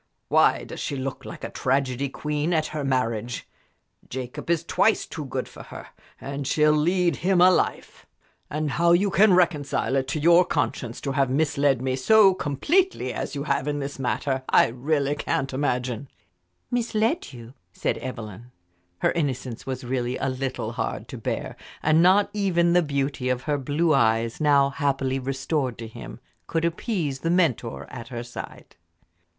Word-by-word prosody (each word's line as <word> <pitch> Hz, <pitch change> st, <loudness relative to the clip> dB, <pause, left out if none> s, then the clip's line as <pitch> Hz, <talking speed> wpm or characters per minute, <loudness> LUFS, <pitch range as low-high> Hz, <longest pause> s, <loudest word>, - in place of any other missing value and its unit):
Why -, -, +4 dB
does -, -, -8 dB
she 145 Hz, -, -3 dB
look 135 Hz, 0 st, -5 dB
like -, -, -9 dB
a -, -, -5 dB
tragedy 135 Hz, 0 st, 0 dB
queen 150 Hz, +4 st, -2 dB
at 155 Hz, -2 st, +2 dB
her 150 Hz, -2 st, -2 dB
marriage? 120 Hz, -4 st, -1 dB, 0.6 s
Jacob 125 Hz, +4 st, -6 dB
is 170 Hz, -1 st, +2 dB
twice 220 Hz, +5 st, +2 dB
too 155 Hz, -, -7 dB
good 130 Hz, -, -3 dB
for -, -, -12 dB
her, -, -, -10 dB, 0.3 s
and 140 Hz, 0 st, -5 dB
she'll 150 Hz, +1 st, +4 dB
lead 170 Hz, +1 st, +2 dB
him 185 Hz, +1 st, +2 dB
a 180 Hz, +1 st, +7 dB
life. -, -, -2 dB, 0.4 s
And 150 Hz, -1 st, -2 dB
how 170 Hz, +4 st, +3 dB
you 195 Hz, +3 st, +3 dB
can 195 Hz, 0 st, +5 dB
reconcile 145 Hz, -7 st, +1 dB
it 135 Hz, -1 st, 0 dB
to 145 Hz, +3 st, -2 dB
your 170 Hz, +3 st, +6 dB
conscience 145 Hz, -8 st, -2 dB
to 140 Hz, -, -2 dB
have 135 Hz, -1 st, +1 dB
misled 140 Hz, -2 st, +1 dB
me 130 Hz, -1 st, 0 dB
so 195 Hz, +8 st, +5 dB
completely 285 Hz, -, 0 dB
as -, -, -4 dB
you 140 Hz, -, -3 dB
have 140 Hz, -1 st, -1 dB
in 145 Hz, 0 st, -1 dB
this 140 Hz, -1 st, -5 dB
matter, 130 Hz, +2 st, -1 dB
I -, -, +5 dB
really 140 Hz, +4 st, 0 dB
can't 135 Hz, -2 st, -2 dB
imagine." 125 Hz, -2 st, -1 dB, 0.6 s
"Misled 235 Hz, +5 st, 0 dB
you?" 120 Hz, -1 st, -11 dB, 0.2 s
said -, -, -2 dB
Evelyn. 115 Hz, -2 st, -7 dB, 0.5 s
Her -, -, +4 dB
innocence 130 Hz, -7 st, -3 dB
was 130 Hz, 0 st, -4 dB
really 125 Hz, 0 st, -2 dB
a 135 Hz, -, -1 dB
little 130 Hz, 0 st, -3 dB
hard -, -, -4 dB
to -, -, -7 dB
bear, -, -, -3 dB, 0.3 s
and 155 Hz, +1 st, +4 dB
not 195 Hz, +3 st, +4 dB
even 175 Hz, -4 st, +2 dB
the 175 Hz, -, +5 dB
beauty 140 Hz, -4 st, -2 dB
of 125 Hz, 0 st, -1 dB
her 145 Hz, -1 st, -1 dB
blue 155 Hz, +5 st, +1 dB
eyes, 115 Hz, -1 st, +2 dB
now 140 Hz, -2 st, +4 dB
happily 135 Hz, -2 st, 0 dB
restored 135 Hz, 0 st, -2 dB
to 115 Hz, -, -7 dB
him, 110 Hz, -, -10 dB, 0.3 s
could 165 Hz, 0 st, 0 dB
appease 170 Hz, -, -2 dB
the 165 Hz, -, -2 dB
mentor 165 Hz, -10 st, +1 dB
at 115 Hz, -, -8 dB
her 120 Hz, -2 st, -5 dB
side. 120 Hz, 0 st, -9 dB
140 Hz, 170 wpm, -25 LUFS, 130-165 Hz, 0.6 s, a